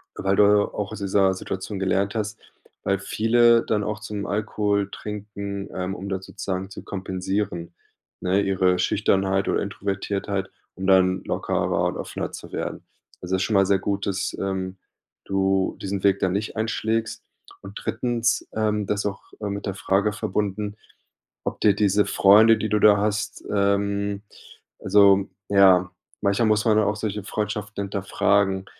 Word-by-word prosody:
weil 95 0 0
du 105 - +7 0.3
auch 105 0 -4
aus 110 - -6
dieser 95 -1 +2
Situation 95 +2 -5
gelernt 100 +2 0
hast. 110 0 -3 0.4
Weil 100 0 +1
viele 115 +3 +3
dann 105 -1 0
auch 105 +1 -3
zum 105 -2 -5
Alkohol 105 -1 -1
trinken, 100 -1 -6
ähm, 95 +1 -3
um 100 +1 -7
da 95 -1 -2
sozusagen 95 0 -5
zu - - -8
kompensieren, 95 -2 -3 0.5
ne, 95 +2 +2
ihre 95 -2 +2
Schüchternheit 95 -1 +1
oder - - +1
Introvertiertheit, 100 0 -3 0.3
um 95 +1 -4
dann 95 -1 +4
lockerer - - -1
und - - -1
offener - - -5
zu - - -10
werden. - - -4 0.4
Also, 90 +1 -1
das 95 - -1
ist - - +2
schon 110 - -1
mal 95 - +5
sehr 100 -1 +3
gut, 100 0 -2
dass, 95 -1 -2
ähm, 95 -1 -3 0.5
du 95 0 0
diesen 100 -1 -3
Weg 100 -1 +4
dann 95 - +1
nicht 105 +3 -3
einschlägst. 110 0 -1 0.4
Und 100 +2 -9
drittens 120 -1 0
ähm, 105 -2 0
das 105 0 0
ist - - -6
auch, 95 -1 -5 0.2
äh, 105 - -2
mit 100 0 -4
der 95 - -3
Frage 100 +3 +1
verbunden, 105 +1 -2 0.7
ob - - -4
dir 105 -2 +4
diese 105 -1 +3
Freunde, 110 +3 +6
die 110 0 -2
du 105 +1 +2
da 105 -1 +6
hast 105 +1 -2
ähm, 100 0 0 0.6
also 100 0 +4 0.2
ja, 95 -2 +5 0.3
manchmal 100 +3 +2
muss 105 +1 +2
man 110 -2 +4
da 110 - +3
auch 105 - 0
solche 105 -2 -3
Freundschaften 105 0 -3
hinterfragen, 95 0 +1
100 Hz, 165 wpm, -24 LUFS, 95-105 Hz, 0.7 s, du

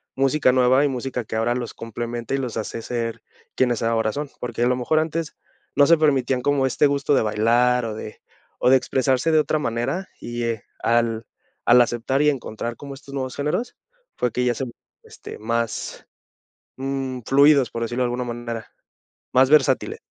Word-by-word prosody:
música 135 0 +3
nueva 130 +2 +4
y - - +3
música 130 -1 -3
que 110 - -6
ahora 115 +2 +1
los 120 -2 -4
complementa 120 +2 -4
y - - 0
los 125 -4 -4
hace 115 +1 -4
ser, 115 -1 -3 0.3
quienes 120 -3 +1
ahora 115 -1 +1
son. 145 0 -4
Porque 120 -1 -4
a - - +3
lo 125 - +2
mejor 130 +5 +1
antes, 160 0 -3 0.4
no 145 0 +5
se 170 - +6
permitían 135 -4 +2
como 140 0 +2
este 130 - +2
gusto 140 0 +1
de - - +3
bailar, 120 +3 +2
o 110 -2 -4
de 110 0 -9 0.4
o - - +3
de 135 - +7
expresarse 130 +3 +1
de 155 - +5
otra 155 0 +1
manera, 135 +9 -2
y, 120 0 -4
eh, 115 -3 -2 0.2
al 115 -1 +1 0.4
al 120 +1 +7
aceptar, 120 +3 0
y 150 - +5
encontrar 120 -4 -4
como 140 +2 -9
estos 140 0 -12
nuevos 130 -2 -3
géneros, 150 +12 -2 0.4
fue 125 - 0
que 125 +2 -1
ya 120 - +2
se 135 - -4 0.4
este, - - -11
más, 115 0 -3 0.7
mm, 135 -1 -3
fluidos, 140 -2 +5
por 115 - -4
decirlo 120 +2 -1
de - - +2
alguna 120 +1 -2
manera. 120 -2 -6 0.6
Más 130 +1 +5
versátile 145 -3 +3
125 Hz, 185 wpm, -23 LUFS, 115-140 Hz, 0.7 s, de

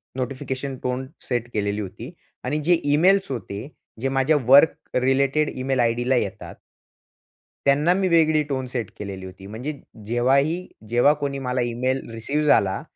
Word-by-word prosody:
Notification 130 +1 -4
tone 125 +1 -2
set 120 -1 -3
केलेली 105 0 -1
होती. 115 - -8 0.3
आणि 145 +4 -1
जे 175 +3 +4
इमेल्स 180 +5 +3
होते 110 -1 -5 0.3
जे 135 - 0
माझ्या 135 +3 +2
वर्क 140 +5 +7 0.3
रिलेटेड 140 +3 +2
इमेल 130 0 -2
आयडीला 120 +2 +2
येतात. 125 - -3 1.1
त्यांना 145 +5 +4
मी 190 0 +1
वेगळी 155 -3 +4
टोन 130 -2 -2
सेट 120 -4 -4
केलेली 95 -2 -6
होती. 95 +1 -11
म्हणजे 115 +9 -5 0.3
जेव्हा 120 +4 +2
ही 160 +6 0 0.2
जेव्हा 120 +5 +4
कोणी 140 -1 -2
मला 125 -1 -2
ईमेल 125 +3 -2
रिसिव्ह 140 +7 -2
झाला 105 -5 +3
130 Hz, 150 wpm, -23 LUFS, 120-145 Hz, 1.1 s, वर्क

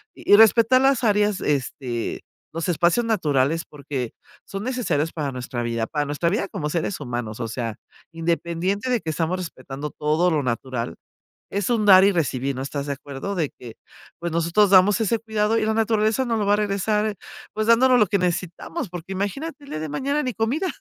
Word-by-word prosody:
y 205 - +4
respetar 230 +3 +6
las 270 -2 +3
áreas, 210 -2 +2
este, 130 -4 -2 0.3
los 165 +2 -3
espacios 175 +7 +2
naturales 160 - +1
porque 140 -5 -5 0.3
son 195 +1 -6
necesarios 195 - -1
para 150 -4 -3
nuestra 125 -1 -4
vida, 115 -1 -1
para 150 -2 -1
nuestra 145 +4 0
vida 200 +1 -1
como 150 - -3
seres 170 +3 -2
humanos, 120 -4 -4
o 115 - -2
sea, 115 -2 -4 0.4
independiente, 170 +6 -1
de 245 -3 +1
que 160 - -5
estamos 165 +3 -1
respetando 145 -4 -6
todo 155 +4 +1
lo 155 -2 +1
natural, 120 -5 -3 0.5
es 200 +1 -2
un 220 -3 +1
dar 190 -2 +8
y 200 - +5
recibir, 140 -5 -1
¿no, 130 - -4
estás 140 +1 -4
de 140 - -1
acuerdo?, 140 +7 -6
de 160 -5 0
que, 120 -3 -10 0.4
pues, 170 0 -3
nosotros 170 +5 +3
damos 190 +2 +6
ese 225 +1 +1
cuidado 220 0 0
y 215 - +1
la 220 - +1
naturaleza 220 +2 +1
nos 230 -2 0
lo 205 - 0
va 200 - +3
a - - +6
regresar, 210 +1 0 0.4
pues, 215 0 -2
dándonos 250 +2 +5
lo 210 - +4
que 200 +2 +1
necesitamos, 180 - -3
porque 180 +2 -7
imagínate 275 - -4
el - - -14
día 155 - -3
de 155 - -4
mañana 280 - -1
ni 255 -2 -2
comida. 255 +12 -1
180 Hz, 195 wpm, -23 LUFS, 145-215 Hz, 0.5 s, dar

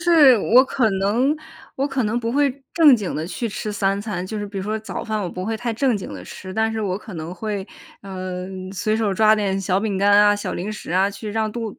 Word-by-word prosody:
是 320 -8 +6
我 250 +6 +5
可 255 -3 +1
能 225 +10 +1 0.4
我 275 - 0
可 270 -3 -1
能 215 +3 0
不 230 0 -2
会 285 0 +3 0.2
正 300 -7 +7
经 205 -4 -4
地 155 +2 -3
去 230 +6 -3
吃 210 +1 -4
3 195 -1 0
餐。 195 -4 -4
就 215 +3 -4
是 205 - -4
比 200 0 -9
如 190 - -3
说 215 +1 -2
早 220 - -6
饭 215 -2 -2
我 180 - -2
不 180 +1 -6
会 220 +2 -2
太 240 0 -3
正 245 0 +1
经 190 - -7
地 90 -2 -9
吃， 185 0 -9
但 220 0 +1
是 220 - -3
我 195 -3 -1
可 210 -1 -10
能 165 +2 -6
会， 205 -1 -4 0.3
呃， 185 -2 -6 0.3
随 215 +3 0
手 220 -3 0
抓 215 +2 +5
点 195 -2 -1
小 190 0 +1
饼 205 -2 -1
干 200 +1 +3
啊， 205 0 +6
小 205 - -4
零 195 +5 -4
食 210 - -8
啊， 190 +3 +2
去 210 +1 -7
让 220 0 -1
肚 225 -2 -4
子 - - -19
210 Hz, 270 characters per minute, -22 LUFS, 195-225 Hz, 0.4 s, 正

